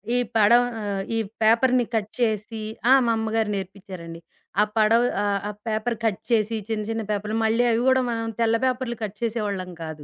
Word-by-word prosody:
ఈ - - +3 0.2
పడవ 235 +3 +6 0.2
ఆహ్, 200 -2 -2
ఈ - - +1 0.2
పేపర్‌ని 245 +2 +4
కట్ 215 -1 -1
చేసి 220 -1 -1 0.3
ఆ! - - +10
మా 230 - +3
అమ్మగారు 220 -1 0
నేర్పించారండి. 185 -3 -8 0.4
ఆ - - +6
పడవ 220 +2 +5 0.2
ఆహ్, 200 -1 +1
ఆ - - -3 0.2
పేపర్ 220 +2 -1
కట్ 210 -4 0
చేసి 225 0 +2
చిన్న 215 -1 -1
చిన్న 225 0 -2
పేపర్లు 210 +2 -2
మళ్ళీ 225 +2 +2
అవి 230 +1 +1
గూడా 260 0 +5
మనం 225 0 -2
తెల్ల 230 0 +3
పేపర్లు 255 -1 -1
కట్ 210 -1 -5
చేసే 235 0 -1
వాళ్ళం 185 -2 -4
కాదు. 155 -2 -7
220 Hz, 185 wpm, -24 LUFS, 205-230 Hz, 0.4 s, ఆ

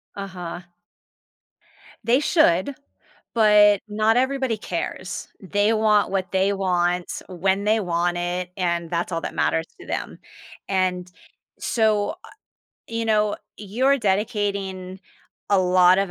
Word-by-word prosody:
Uh-huh. 180 -3 -6 1.4
They 240 +4 +3
should, 270 - +2 0.6
but 210 -2 +5
not 215 +2 +2
everybody 260 -3 0
cares. 180 0 -5
They 205 +3 +1
want 215 -2 +3
what 190 -1 -2
they 190 +1 +2
want, 180 -2 -1
when 190 +2 0
they 215 +1 +2
want 175 -1 0
it, 175 +1 -3
and 170 -2 -1
that's 170 +1 -2
all 165 0 -2
that - - -5
matters 165 0 +1
to - - -12
them, - - -4 0.5
and 185 -2 -1 0.5
so, 215 -3 +1
uh, - - -13 0.6
you 230 0 -3
know, 215 -1 +2 0.2
you're 255 +7 +1
dedicating 195 -2 -2 0.5
a 200 - +5
lot 180 0 +5
of 195 -2 0
195 Hz, 125 wpm, -23 LUFS, 180-215 Hz, 1.4 s, but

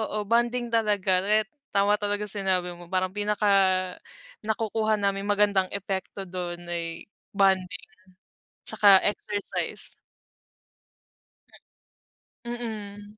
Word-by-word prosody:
oo 215 -1 -2
bonding 240 +2 +1
talaga 205 -5 +2
ret 210 +2 +2 0.2
tama 205 +1 +2
talaga 205 0 -1
sinabi 190 -3 -1
mo 175 0 -12
parang 185 0 0
pinaka 210 0 -1 0.9
nakukuha 220 0 0
namin 200 0 -1
magandang 200 -2 +3
epekto 195 0 -4
dun 175 -1 -6
ay 170 -1 -5 0.3
bonding 190 -2 +2 0.8
tsaka 200 -2 +7
exercise. 205 0 -3 2.5
Mm. 210 -3 -6
205 Hz, 90 wpm, -26 LUFS, 190-210 Hz, 2.5 s, tsaka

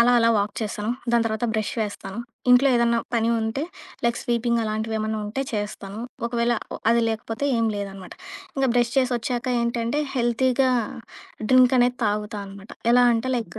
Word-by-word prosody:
అలా 245 +1 +5
అలా 230 0 +4
వాక్ 205 0 -1
చేస్తాను. 210 +1 -3 0.2
దాని 235 -1 +4
తర్వాత 220 +1 -2
బ్రష్ 215 -1 -1
వేస్తాను. 205 0 -4 0.3
ఇంట్లో 250 +3 +6
ఏదన్నా 235 0 +3 0.2
పని 230 0 +2
ఉంటే 225 +6 -2 0.4
లైక్ 235 0 +1
స్వీపింగ్ 235 -1 +1
అలాంటివి 220 +1 -2
ఏమన్నా 215 0 -2
ఉంటే 230 +6 -2
చేస్తాను. 205 0 -4 0.3
ఒకవేళ 235 0 +1 0.4
అది 235 0 +3
లేకపోతే 225 +3 -3
ఏం 230 - +2
లేదనమాట. 195 -2 -6 0.4
ఇంక 270 - +2
బ్రష్ 240 0 +2
చేసొచ్చాక 245 -1 -1 0.2
ఏంటంటే, 235 +4 -1 0.2
హెల్తీగా 255 +2 +2 0.8
డ్రింక్ 255 0 +6
అనేది 245 0 +2
తాగుతా 210 +1 -2
అనమాట. 195 +1 -12 0.2
ఎలా 245 0 +6
అంటే 245 +3 -1
లైక్ 225 -1 -5
235 Hz, 155 wpm, -24 LUFS, 215-245 Hz, 0.8 s, ఇంట్లో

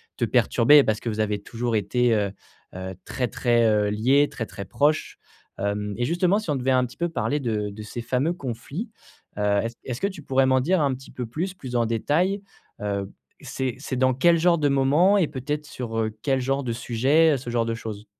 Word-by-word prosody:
te - - -3
perturber. 145 +4 +5
Parce 110 0 0
que 120 - -3
vous 110 0 -4
avez 105 -1 0
toujours 120 -1 -2
été, 115 +4 +2
heu, 100 -2 +1 0.7
très, 125 -1 -2
très, 120 -1 +2
heu, 105 -1 +3
liés, 130 +7 +3
très, 115 -4 -4
très 100 - -8
proches, 150 +8 0 0.4
hem 100 0 -2
et 120 - -1
justement, 175 +5 +2
si 210 - -7
on 145 - +1
devait 130 +1 0
un 125 -1 +3
petit 125 - -12
peu 170 - 0
parler 150 -2 -1
de 110 -5 -2
de 100 +2 -9
ces 120 +3 -6
fameux 130 +8 0
conflits, 140 - -6 0.5
heu, - - -2 0.2
est-ce 115 +1 -4
est-ce 125 -1 -5
que 200 - +2
tu 190 -6 -8
pourrais 135 -1 +2
m'en 130 0 +4
dire 175 +4 +2
un 140 -2 +2
petit 135 - -13
peu 125 - -5
plus, 175 +10 -3
plus 130 -9 -7
en 115 - +2
détails? 165 - 0 0.4
Heu, 100 -1 -3 0.3
c'est 130 -2 -3
c'est 135 -2 -4
dans 130 0 +3
quel 170 +6 +4
genre 170 +1 +3
de 145 -2 +1
moments 145 +9 +4
et 170 -6 +3
peut-être 150 +2 -4
sur, 120 -5 -6
heu, 110 -1 -1
quel 135 -2 +1
genre 135 +2 -1
de 120 -2 -2
sujets? 135 +7 +3
Heu, - - +1
ce 120 -1 -7
genre 120 -1 0
de 115 - -1
choses. 110 -2 -7
130 Hz, 220 wpm, -24 LUFS, 115-150 Hz, 0.7 s, perturber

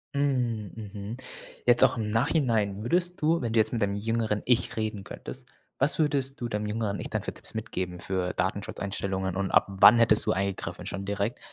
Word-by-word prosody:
Mhm, 125 -7 0
mhm. 105 +1 -7 0.5
Jetzt 120 -1 +7
auch - - +1
im 105 -1 -2
Nachhinein 115 -5 +1
würdest 180 +6 0
du 165 +2 +2
wenn 115 -3 -2
du 115 - +3
jetzt 110 - +3
mit 115 -3 -2
deinem 100 0 +1
jüngeren 110 0 -1
Ich 125 -2 +2
reden 110 -3 -3
könntest, 125 -1 -8 0.3
was 140 +4 +4
würdest 140 -3 +1
du 120 - -2
deinem 105 0 -2
jüngeren 105 -1 -2
Ich - - -5
dann - - -2
für - - -4
Tipps - - -9
mitgeben 90 -1 -4
für 95 -1 -2
Datenschutzeinstellungen 95 0 -3
und 100 -1 -1
ab - - +4
wann 105 +4 +7
hättest 110 -2 +4
du - - +2
eingegriffen? 100 0 -3
Schon 100 0 -4
direkt 100 +3 -2
110 Hz, 195 wpm, -27 LUFS, 100-120 Hz, 0.5 s, Jetzt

